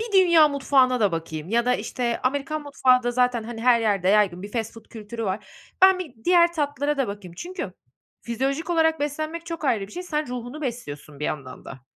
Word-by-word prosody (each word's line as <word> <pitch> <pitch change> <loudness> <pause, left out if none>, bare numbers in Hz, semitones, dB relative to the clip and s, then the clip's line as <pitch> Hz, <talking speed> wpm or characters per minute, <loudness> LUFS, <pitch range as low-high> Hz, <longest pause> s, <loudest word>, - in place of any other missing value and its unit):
bir 450 -1 -5
dünya 340 -5 +6
mutfağına 265 -3 +2
da 205 -5 +3
bakayım." 160 0 -5
Ya 235 +2 +2
da, 250 - +3
işte, 240 -2 -2
Amerikan 285 +3 -1
mutfağı 255 -3 +3
da 245 - 0
zaten, 245 -1 +1
hani, 225 -1 -7
her 245 -2 +5
yerde 200 -4 +1
yaygın 195 -3 +3
bir 205 - -8
fast 225 -2 -2
food 225 -1 -13
kültürü 225 +1 -7
var. 195 +1 -3 0.4
"Ben 380 -1 +7
bir 325 -9 -7
diğer 345 -1 +5
tatlılara 290 -2 -1
da 265 -6 0
bakayım." 195 -4 -8
Çünkü 365 - -6 0.5
fizyolojik 275 +8 -2
olarak 320 -2 +2
beslenmek 310 +3 -3
çok 330 -1 -5
ayrı 220 -8 +1
bir - - -16
şey, 360 - -5
sen 305 -4 -2
ruhunu 250 +4 -6
besliyorsun 150 - -6
bir - - -2
yandan 130 -4 -5
da. 130 -2 -10
250 Hz, 205 wpm, -24 LUFS, 210-305 Hz, 0.5 s, Ben